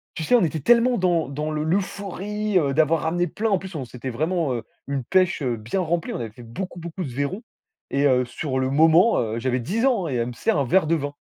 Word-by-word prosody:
tu 160 - -3
sais, 245 - +3
on 225 - +4
était 160 -1 -1
tellement 240 - +4
dans 175 -5 +1
dans 150 +2 -3
le 150 0 -2
l'euphorie, 200 +3 -2
heu, 140 -3 0
d'avoir 160 +1 +3
ramené 175 +2 0
plein 220 +1 -2
en 195 -3 +2
plus, 190 -2 -9
on 135 -4 -4
c'était 125 +2 -7
vraiment, 155 +2 0
heu, 120 - -3 0.2
une 140 -2 -2
pêche, 185 -2 +2
heu, 125 -3 0
bien 115 - -3
remplie, 170 -1 -1
on - - -4
avait 115 -2 -5
fait 120 +2 -13
beaucoup, 175 +10 -6
beaucoup 170 +2 -5
de - - -5
vairons 145 - -3 0.5
et 140 +1 +2
heu, 125 -1 +3
sur 130 +2 -3
le 130 0 0
moment, 160 +9 +5
heu, 115 0 -2
j'avais 125 +1 0
10 220 - -1
ans, 230 -10 +2
hein - - -3
et 125 - -1
elle 120 0 0
me 125 - -6
sert 150 - 0
un 140 - +1
verre 185 +7 +3
de 165 - +3
vin. 145 -1 -3
160 Hz, 260 wpm, -23 LUFS, 130-185 Hz, 0.5 s, moment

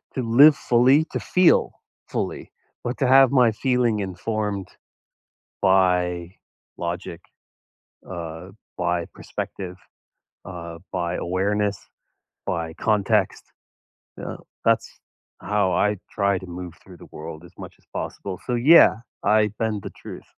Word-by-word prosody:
to 130 - -1
live 135 +6 +7
fully, 130 +6 +4
to - - -2
feel 180 -1 +3 0.3
fully, - - -4 0.3
but 120 +1 -3
to 130 - +2
have 135 0 +6
my 125 -4 +5
feeling 120 -1 +1
informed 100 +1 -3 0.9
by 90 -2 +2 0.4
logic, 85 -1 -5 0.9
uh, 85 0 -7 0.3
by 85 -1 -1
perspective, 90 -2 -6 0.7
uh, 85 -2 -8
by 90 -1 -2
awareness, 100 +3 -1 0.7
by 80 -1 -3
context, 105 +2 +1 0.7
you - - -8
know, - - -7 0.2
that's - - +1 0.4
how 105 -3 0
I 105 +2 +1
try 100 -2 +1
to 95 - -10
move 90 -1 -7
through 90 -2 -14
the - - -14
world 80 +1 -8
as 90 +1 -15
much - - -10
as - - -31
possible. 95 -2 -5
So 125 - -1
yeah, 135 +1 +7 0.3
I 105 0 +3
bend 110 -3 -1
the - - -6
truth. - - -11
100 Hz, 125 wpm, -23 LUFS, 90-115 Hz, 0.9 s, live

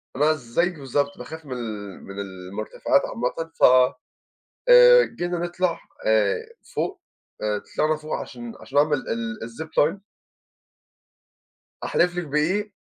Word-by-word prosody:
أنا 150 +4 +3
زيّك 155 +6 -1
بالضبط 140 +1 -1
باخاف 160 +5 -9
من 130 - -6
ال 105 -5 -6
من 100 +1 -8
المُرتفعات 95 +2 -1
عامةً، 125 +8 -3
ف - - -5 1.1
آآ - - +9
جينا 175 -5 -3
نطلع 175 0 -1 0.3
آآ 110 -2 +3 0.4
فوق، - - -2 0.4
آآ 105 -1 0 0.2
طلعنا 155 +1 +3
فوق 155 0 -7
عشان 120 -2 -7
عشان - - -5
نعمل 145 0 +4
ال 115 -1 -3
الZipline. 160 - -1 1.8
أحلف 175 0 +2
لِك 175 -1 -2
بإيه، 185 +9 0
145 Hz, 120 wpm, -24 LUFS, 115-170 Hz, 1.8 s, آآ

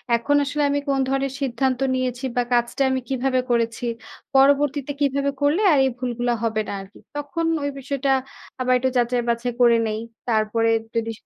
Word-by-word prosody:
এখন 260 +5 +1
আসলে 290 +1 -1
আমি 285 0 +1
কোন 270 -1 +2
ধরনের 270 0 -1
সিদ্ধান্ত 260 0 0 0.2
নিয়েছি 255 0 -2
বা 245 - +3
কাজটা 240 +3 +1
আমি 260 - +1
কীভাবে 260 -1 +1
করেছি, 230 0 0 0.5
পরবর্তীতে 285 +1 +3
কীভাবে 280 0 +1
করলে 295 +8 +2
আর 295 - +4
এই - - +2
ভুলগুলো 245 -1 -1
হবে 220 -1 0
না - - -4
আর - - -9
কি। - - -16 0.2
তখন 290 +3 -3 0.2
ওই 285 - 0
বিষয়টা 275 0 -2 0.5
আবার 255 0 +2
একটু 260 +1 0
যাচাই-বাছাই 240 0 0
করে 235 -1 +6
নিই। 215 0 -2 0.3
তারপরে 225 0 +1 0.3
যদি 230 0 0
255 Hz, 170 wpm, -23 LUFS, 235-275 Hz, 0.5 s, করে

